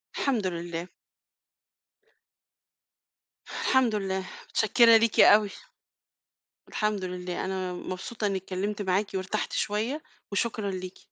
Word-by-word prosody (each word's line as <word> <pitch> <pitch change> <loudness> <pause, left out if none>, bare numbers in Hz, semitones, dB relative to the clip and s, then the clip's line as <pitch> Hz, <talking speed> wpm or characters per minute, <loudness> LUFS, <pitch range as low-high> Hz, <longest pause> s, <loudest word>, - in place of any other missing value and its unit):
الحمد 235 -9 0
لله. 170 0 -4 2.6
الحمد 250 -5 +1
لله، 190 -2 -2 0.2
متشكّرة 230 +1 +6
ليكِ 225 -1 +1
أوي. 210 -1 +7 1.2
الحمد 210 -3 -1
لله، 180 0 -4
أنا 185 -1 -3
مبسوطة 190 +5 -4
إني 195 -1 0
اتكلّمت 195 +3 -3
معاكِ 195 +2 +1
وارتحت 190 +3 -2
شوية 225 +9 -1 0.3
وشكرًا 205 -1 -1
ليكِ. 185 0 -6
195 Hz, 95 wpm, -27 LUFS, 185-215 Hz, 2.6 s, أوي